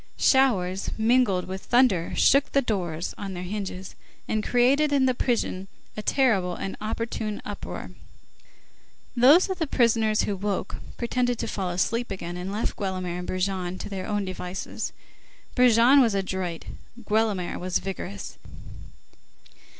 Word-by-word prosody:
Showers 195 -9 +2
mingled 220 -5 +2
with 190 +1 -6
thunder 240 -9 +3
shook 275 +1 +4
the 275 - +4
doors 175 -7 -2
on 195 -2 -5
their 175 - -5
hinges, 190 -1 -5 0.3
and 215 -1 -1
created 270 +5 +3
in 275 -2 +3
the 255 - +3
prison 230 -6 -1 0.3
a 215 - -4
terrible 205 -9 +2
and 195 - -5
opportune 215 -1 -3
uproar. 205 - -6 1.2
Those 275 +9 +6
of 380 -1 -4
the 320 - 0
prisoners 225 -4 +2
who 205 - -1
woke, 195 0 -3 0.2
pretended 245 0 0
to - - -3
fall 190 -3 -3
asleep 230 +7 -1
again, 175 -3 -5
and 180 +2 -5
left 210 +3 -2
Guelemer 185 -3 -3
and 180 - -6
Brujon 185 -1 -2
to - - -6
their 190 -2 -5
own 205 -2 -1
devices. 185 0 -5 0.6
Brujon 250 +2 +6
was 230 -5 +2
adroit; 190 -3 -3 0.4
Guelemer 210 -4 0
was 180 0 0
vigorous. 185 - -6
205 Hz, 140 wpm, -26 LUFS, 185-240 Hz, 1.2 s, Those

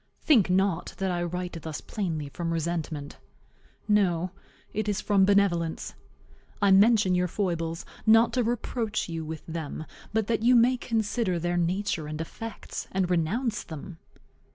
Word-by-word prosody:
Think 235 - +5
not 190 -1 +1
that 190 -1 -1
I 175 -1 -1
write 175 -1 -4
thus 155 -1 -5
plainly 165 -8 -3
from 165 +3 -3
resentment. 160 -3 -3 0.7
No, 185 -4 +2 0.4
it 215 0 -1
is 205 0 0
from 200 -2 +3
benevolence. 190 -5 +1 0.7
I 200 -1 +4
mention 205 -1 +5
your 180 0 +2
foibles, 165 -3 -2 0.2
not 225 +1 +6
to 250 -1 +2
reproach 230 -1 -2
you 165 -1 -3
with 155 0 -7
them, 160 -1 -5 0.3
but 220 0 +1
that 225 0 0
you 245 +2 +5
may 240 +2 +5
consider 220 -5 0
their 175 +1 -1
nature 175 -2 0
and 155 0 -5
effects, 220 +7 -6
and 185 -1 0
renounce 210 +8 0
them. 160 +2 -9
185 Hz, 150 wpm, -27 LUFS, 165-215 Hz, 0.7 s, not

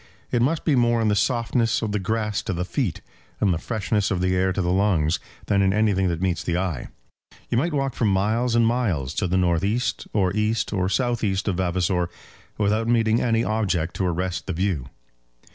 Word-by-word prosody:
It 120 - +2
must 150 +6 +1
be 150 - +3
more 120 -1 +3
in 110 -1 +2
the 105 - +2
softness 115 +1 +1
of 110 - -1
the 105 - 0
grass 105 +1 -1
to - - -3
the 90 +1 -2
feet, 105 - -2 0.4
and 100 -4 +3
the 80 - -2
freshness 105 -1 -1
of 95 -4 0
the 90 0 +1
air 95 +1 +2
to 95 - -3
the 90 - 0
lungs, 90 -5 +2 0.3
than 100 -1 +2
in 95 0 +3
anything 100 -3 +2
that 85 0 -2
meets 90 -2 0
the 85 0 -1
eye. 90 -8 -2 0.6
You 115 - +2
might 170 +6 0
walk 135 -3 -1
for 115 - -1
miles 110 +5 +1
and 115 -1 +4
miles 100 - 0
to 95 - -1
the 90 +1 +1
north 85 -1 +2
east, 115 +5 -1
or 95 -2 +1
east, 110 +1 0
or 95 -2 0
south 120 +1 0
east 95 -1 0
of 95 -4 0
Vavasor 90 -1 0 0.5
without 105 +2 +1
meeting 115 -1 +2
any 115 -1 +2
object 95 -6 -1
to 95 - 0
arrest 90 +1 -2
the - - -2
view. 90 -7 -1
100 Hz, 210 wpm, -24 LUFS, 90-115 Hz, 0.6 s, and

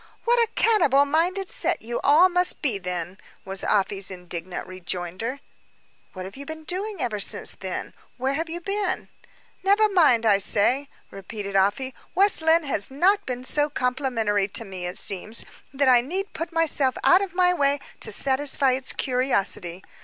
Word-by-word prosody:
"What 480 +1 +2
a 460 -2 +2
cannibal 295 - +3
minded 350 +6 0
set - - -2
you 235 +1 -4
all 310 +6 +6
must 360 -2 0
be, 235 -9 0
then!" 180 0 -5 0.3
was 195 0 0
Afy's 195 -1 0
indignant 180 -1 -7
rejoinder. 185 - -5 0.7
"What 185 0 -7
have 195 - -10
you 280 - -8
been 315 +2 -8
doing 385 +4 -4
ever 220 -6 -2
since, 195 - +2
then? - - -6 0.2
Where 265 +2 -1
have 325 +3 -3
you 345 +2 -6
been?" 395 0 -3 0.5
"Never 405 +3 +3
mind, 305 - +3
I 205 -3 +4
say," 245 +8 +3 0.2
repeated 200 0 -7
Afy. 205 +7 +1 0.2
"West 395 -2 +4
Lynne 320 +1 +3
has 265 -8 +1
not 380 +9 +1
been 250 -1 -4
so 295 +3 0
complimentary 250 -7 -1
to 225 +3 -3
me, 185 -3 -6
it 180 - -4
appears, 205 +4 -2 0.3
that 280 0 0
I 250 -2 +6
need 375 +10 -5
put 330 +2 -5
myself 305 -5 +2
out 365 +2 +5
of 385 -2 -5
my 360 -1 +3
way 285 -3 +1 0.2
to - - 0
satisfy 275 0 +3
its 260 +1 -2
curiosity. 200 -8 -1
265 Hz, 170 wpm, -24 LUFS, 200-335 Hz, 0.7 s, all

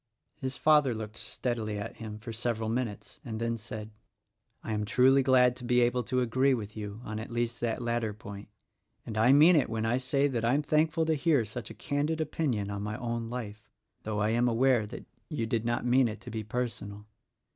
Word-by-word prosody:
His 130 -2 -4
father 150 -5 +4
looked 110 0 -6
steadily 110 -4 -3
at 105 +3 -6
him 110 -2 -7
for 115 +1 -7
several 115 -1 -2
minutes, 115 -3 -4
and 110 -5 -5
then 115 0 0
said, 110 -1 -7 0.7
"I 110 - -3
am 105 0 -1
truly 130 +5 +4
glad 125 -2 +4
to - - -9
be 125 0 +3
able 120 +1 +2
to 125 +1 0
agree 130 +3 +3
with 105 -3 -6
you 105 0 -6
on 110 -2 -5
at 110 - -6
least 120 0 -2
that 120 0 -1
latter 115 -2 0
point; 100 -1 -9 0.6
and 110 - -6
I 110 +4 +5
mean 155 +6 +7
it 150 - +3
when 110 -1 -2
I 115 +2 +2
say 135 +2 +1
that 120 -5 -2
I 120 +3 +3
am 150 - +1
thankful 155 +2 +2
to 160 - +2
hear 150 -5 +2
such 110 +1 -7
a - - -9
candid 150 +3 -1
opinion 135 -10 -1
on 100 0 -4
my 105 +1 -3
own 115 -1 -3
life,— 110 -3 -6 0.3
though 105 -1 -3
I 105 - +2
am 120 +2 +2
aware 120 -1 +3
that 110 - -9 0.2
you 150 -8 -2
did 115 0 -1
not 120 +1 -1
mean 125 -3 +3
to - - -10
be 110 -1 -3
personal. 105 -3 -4
120 Hz, 210 wpm, -29 LUFS, 110-130 Hz, 0.7 s, mean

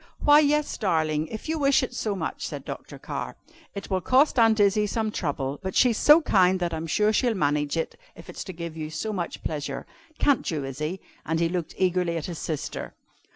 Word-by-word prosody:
"Why, 295 0 +8
yes, 300 0 +1
darling, 160 -5 +1
if 220 - -7
you 320 0 -1
wish 275 -2 +3
it 250 - -4
so 215 -4 -2
much," - - -4
said - - -7
Dr. - - -7
Carr. - - -5 0.4
"It 200 0 -7
will 185 -1 +1
cost 260 - +3
Aunt 225 -1 +5
Izzie 205 +1 +3
some 220 +1 -1
trouble, 140 -6 -3
but 190 -1 -4
she's 245 -4 +4
so 305 +2 +7
kind 185 -5 +3
that 175 -2 -1
I'm 160 +1 -4
sure 210 +6 +2
she'll 235 +1 +2
manage 145 -2 0
it 165 - -2 0.2
if - - -13
it - - -10
is - - -4
to 190 - -6
give 170 -1 -6
you 155 -1 -5
so 215 +7 -3
much 175 -4 -4
pleasure. 145 -3 -4 0.3
Can't 285 -3 +2
you, 150 -4 -2
Izzie?" 155 +7 -4 0.2
And 160 +1 -1
he 165 0 +2
looked 175 -2 -3
eagerly 180 -2 +1
at 155 - -4
his 170 -3 -6
sister. 155 -3 -5
185 Hz, 215 wpm, -26 LUFS, 160-220 Hz, 0.4 s, Why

